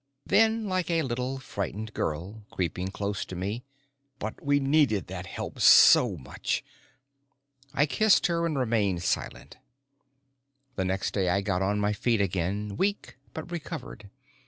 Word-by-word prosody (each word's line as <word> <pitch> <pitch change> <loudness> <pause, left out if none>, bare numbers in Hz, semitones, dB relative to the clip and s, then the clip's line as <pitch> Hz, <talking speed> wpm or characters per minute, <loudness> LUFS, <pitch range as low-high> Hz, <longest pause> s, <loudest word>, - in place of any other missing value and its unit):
Then, 220 +2 +3
like 185 -3 -1
a 165 -2 +1
little 125 +1 -3
frightened 105 -3 -5
girl, 90 +8 -4
creeping 90 +1 -3
close 100 0 -3
to 95 - -8
me: 100 +7 -4 0.5
"But 110 +1 -6
we 145 0 +3
needed 135 -7 +2
that 95 0 -7
help - - -6
so 105 -8 +7
much." 65 - -3 1.1
I 145 +1 +2
kissed 215 +7 +3
her 170 -1 +1
and 155 -4 -2
remained 105 -8 0
silent. - - -3 1.2
The 95 - -1
next 95 +1 -1
day 95 -3 +1
I 100 +3 +2
got 95 -2 -1
on 100 +2 +1
my 105 0 +1
feet 115 +2 +1
again, 100 +2 -2
weak 200 +1 -1 0.2
but 160 +2 -7
recovered. 155 - -7
105 Hz, 145 wpm, -27 LUFS, 95-145 Hz, 1.2 s, so